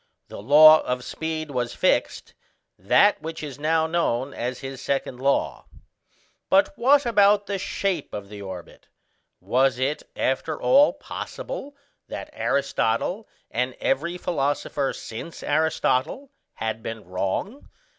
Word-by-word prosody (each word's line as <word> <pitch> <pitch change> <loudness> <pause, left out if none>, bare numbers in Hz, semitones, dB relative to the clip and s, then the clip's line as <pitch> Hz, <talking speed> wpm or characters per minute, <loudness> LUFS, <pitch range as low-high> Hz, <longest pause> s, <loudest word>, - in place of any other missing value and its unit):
The - - -8
law 155 +6 +8
of 125 0 -3
speed 160 0 -4
was 120 -2 -2
fixed: - - 0 0.5
that 175 - +4
which 160 0 -6
is 145 -2 -7
now 160 +1 +2
known 145 -6 -1
as 125 +1 -4
his 135 -1 -7
second 135 -2 -2
law. 140 +1 0 0.8
But 290 +1 +3
what 275 +3 +4
about 205 -2 +4
the 200 -1 -3
shape 185 -4 -2
of 100 -1 -6
the 105 0 -10
orbit 95 -3 -9 0.5
Was 130 +1 +2
it 135 +4 -1
after 145 +4 -1
all 280 +3 +5
possible 395 - -7 0.3
that - - -7
Aristotle, 140 - -1 0.2
and 125 +1 -1
every 170 +6 -1
philosopher 145 -4 -1
since 115 +9 -8
Aristotle, 155 - 0 0.2
had 110 0 -3
been 115 0 -7
wrong? 95 - -4
145 Hz, 125 wpm, -24 LUFS, 125-180 Hz, 0.8 s, law